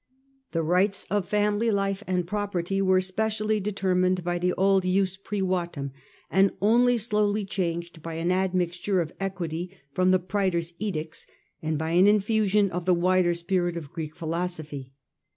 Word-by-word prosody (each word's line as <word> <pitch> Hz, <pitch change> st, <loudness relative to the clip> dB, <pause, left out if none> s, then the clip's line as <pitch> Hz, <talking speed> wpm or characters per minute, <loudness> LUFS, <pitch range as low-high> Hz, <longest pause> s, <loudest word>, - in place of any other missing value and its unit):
The 165 Hz, -1 st, 0 dB
rights 185 Hz, +4 st, +1 dB
of 205 Hz, -3 st, 0 dB
family 210 Hz, +2 st, +2 dB
life 195 Hz, -1 st, 0 dB
and 180 Hz, -1 st, 0 dB
property 195 Hz, -1 st, -2 dB
were 185 Hz, -1 st, +4 dB
specially 215 Hz, +3 st, 0 dB
de 205 Hz, +1 st, -2 dB
termined 185 Hz, -2 st, +1 dB
by 175 Hz, 0 st, -1 dB
the 180 Hz, +1 st, +1 dB
old 195 Hz, 0 st, +3 dB
Jus 185 Hz, +1 st, +1 dB
Privatum 185 Hz, -7 st, -2 dB, 0.4 s
and 195 Hz, +1 st, +4 dB
only 240 Hz, +4 st, +4 dB
slowly 210 Hz, -2 st, +1 dB
changed 170 Hz, -3 st, -3 dB
by 165 Hz, 0 st, -6 dB
an 165 Hz, +2 st, 0 dB
admixture 185 Hz, 0 st, 0 dB
of 165 Hz, -2 st, -2 dB
equity 185 Hz, -1 st, -4 dB
from 185 Hz, +5 st, +2 dB
the 185 Hz, -, +5 dB
Praetors' 180 Hz, -3 st, -1 dB
Edicts, 160 Hz, -7 st, -4 dB, 0.3 s
and 155 Hz, -1 st, -1 dB
by 160 Hz, +2 st, -2 dB
an 180 Hz, +3 st, +5 dB
infusion 210 Hz, -1 st, +3 dB
of 175 Hz, 0 st, -3 dB
the 180 Hz, -1 st, +4 dB
wider 180 Hz, 0 st, +2 dB
spirit 175 Hz, 0 st, -1 dB
of 150 Hz, -5 st, -8 dB
Greek 155 Hz, -2 st, -5 dB
philosophy. 160 Hz, -5 st, -4 dB
185 Hz, 155 wpm, -26 LUFS, 170-200 Hz, 0.4 s, the